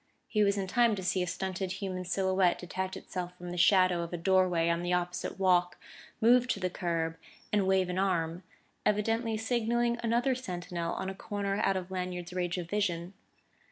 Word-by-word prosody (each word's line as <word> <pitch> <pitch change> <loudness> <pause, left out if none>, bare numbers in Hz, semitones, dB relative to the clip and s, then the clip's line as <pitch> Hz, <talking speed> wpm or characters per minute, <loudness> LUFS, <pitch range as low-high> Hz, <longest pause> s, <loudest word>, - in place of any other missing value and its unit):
He 215 - +1
was 200 0 +2
in 195 - -1
time 230 +3 +3
to 190 - -5
see 185 0 +1
a 180 - -1
stunted 190 0 -3
human 190 -2 -4
silhouette 190 0 +2
detach 190 +1 -4
itself 180 -1 -6
from 175 0 -7
the - - -4
shadow 185 -1 +5
of 170 - -5
a 175 - -3
doorway 180 -1 +3
on 170 0 +1
the 175 0 -1
opposite 180 +1 -2
walk, 180 -2 +3 0.4
move 245 +2 +5
to 205 - -1
the 185 -1 -1
curb, 165 -2 -2 0.4
and 200 -2 +3
wave 190 -1 +3
an 180 +1 -2
arm 175 -3 0 0.4
evidently 225 +2 +1
signaling 235 +1 0
another 235 +3 +2
sentinel 180 -8 -4
on 190 - -3
a - - -6
corner 200 0 -3
out 195 -2 +2
of 185 0 -6
Lanyard's 180 -1 -4
range 180 0 -1
of 175 -2 -4
vision. 180 -2 -1
185 Hz, 190 wpm, -30 LUFS, 180-205 Hz, 0.4 s, shadow